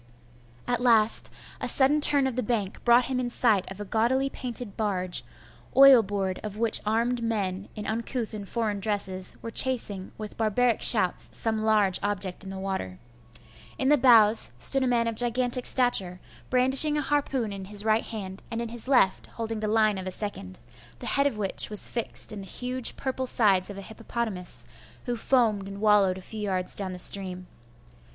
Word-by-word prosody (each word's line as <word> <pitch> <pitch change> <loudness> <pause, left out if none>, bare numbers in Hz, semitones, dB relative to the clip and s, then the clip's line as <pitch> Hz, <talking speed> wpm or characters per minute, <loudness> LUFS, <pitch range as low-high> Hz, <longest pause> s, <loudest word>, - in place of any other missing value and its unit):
At 245 0 -1
last, 230 -3 +3 0.3
a - - -4
sudden 290 +3 +4
turn 285 -2 +4
of 260 -3 -3
the 255 - -1
bank 210 -4 -4
brought 240 +1 +4
him 255 -1 -3
in 245 -1 -3
sight 220 -5 +1
of 195 - -10
a 205 - -6
gaudily 250 +6 0
painted 240 -4 -4
barge, 185 -4 -2 0.5
oil 270 -3 +8
board 195 -2 -4
of 210 -1 -8
which 225 0 +3
armed 235 +3 -1
men, 200 -4 -3
in 210 - -7
uncouth 230 +1 -4
and 205 -2 -8
foreign 220 -4 -3
dresses, 195 -2 -2
were 230 - -6
chasing 225 -7 0
with 215 -1 -9
barbaric 230 +2 0
shouts - - +3
some 220 -1 -2
large 215 -4 +2
object 200 -2 -3
in 190 - -9
the 195 - -7
water. 190 - -5 0.8
In 265 - 0
the 295 - +5
bows 225 - +4
stood 270 - +2
a 260 - 0
man 240 -2 +1
of 230 - -2
gigantic 245 +2 +1
stature, 195 -8 +3 0.3
brandishing 265 +4 +6
a - - 0
harpoon 270 -6 -2
in 195 -1 -8
his 205 +1 -2
right 220 0 +1
hand, 195 -4 -7
and 230 - -5
in 235 -1 -4
his 235 +1 -3
left 245 -9 +1
holding 225 -1 -6
the 215 - -3
line 215 -2 +1
of 185 - -7
a - - -2
second, 180 - -4 0.4
the - - -10
head 280 0 +2
of 265 - -4
which 195 -2 +1
was 210 -1 +2
fixed 235 -2 -2
in 210 -2 -8
the 195 - -10
huge 250 +5 -3
purple 260 -1 -3
sides 200 -6 +2
of 200 - -9
a - - -7
hippopotamus, 220 -3 -6 0.4
who 245 -2 -3
foamed 225 -5 0
and 200 0 -9
wallowed 205 -3 +2
a - - -10
few 220 +2 -8
yards 185 -3 -1
down 195 -2 -4
the 180 - -8
stream. 185 0 +2
220 Hz, 190 wpm, -25 LUFS, 195-245 Hz, 0.8 s, oil